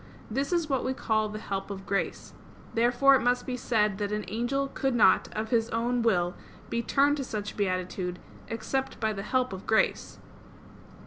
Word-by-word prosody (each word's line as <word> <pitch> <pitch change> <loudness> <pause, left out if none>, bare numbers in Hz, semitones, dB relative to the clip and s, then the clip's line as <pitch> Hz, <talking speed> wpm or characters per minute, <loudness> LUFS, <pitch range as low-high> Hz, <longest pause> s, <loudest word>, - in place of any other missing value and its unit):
This 275 +7 -1
is 340 -3 +1
what 270 -3 0
we 260 0 -1
call 215 -3 0
the 210 - -6
help 195 -2 -4
of 195 -1 -6
grace. 200 0 -2 0.4
Therefore 245 +4 +4
it 265 - +5
must 245 +1 +1
be 255 - -2
said 210 -5 +1
that 205 0 -2
an 210 0 -2
angel 240 +6 -1
could 270 -2 -1
not 230 - +5
of 215 +1 -3
his 230 -1 +2
own 240 +2 0
will 180 -6 +2 0.4
be 235 - 0
turned 285 +4 +3
to 275 - -2
such 210 -4 -5
beatitude, 185 -2 -2 0.3
except 265 +4 -3
by 220 -1 0
the 195 - -5
help 255 +2 0
of 190 - -8
grace. 220 - +1
225 Hz, 185 wpm, -28 LUFS, 205-255 Hz, 0.4 s, it